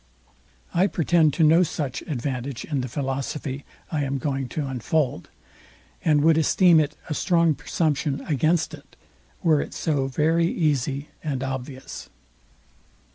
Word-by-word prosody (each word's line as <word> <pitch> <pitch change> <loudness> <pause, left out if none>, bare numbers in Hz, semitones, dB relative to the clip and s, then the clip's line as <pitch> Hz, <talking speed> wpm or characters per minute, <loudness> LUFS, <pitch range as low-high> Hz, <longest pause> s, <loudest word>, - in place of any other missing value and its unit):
I 185 +3 +4
pretend 165 -3 +3
to 165 - +3
no 160 +3 +6
such 145 -6 -2
advantage 130 -3 -4
in 145 -4 -1
the 125 - -3
philosophy 135 +1 -3 0.3
I 150 -3 0
am 135 0 -1
going 135 -1 -2
to 150 +2 -3
unfold, 135 - -1 0.7
and 150 -2 +3
would 160 0 +5
esteem 170 +1 +5
it 150 0 0
a 155 - -2
strong 170 0 +3
presumption 145 -2 -1
against 155 +3 +1
it, - - -13 0.5
were 155 -4 +4
it - - -7
so 145 -4 0
very 160 +5 +2
easy 145 -4 0
and 135 -4 -2
obvious. 130 0 -6
145 Hz, 135 wpm, -24 LUFS, 135-160 Hz, 0.7 s, no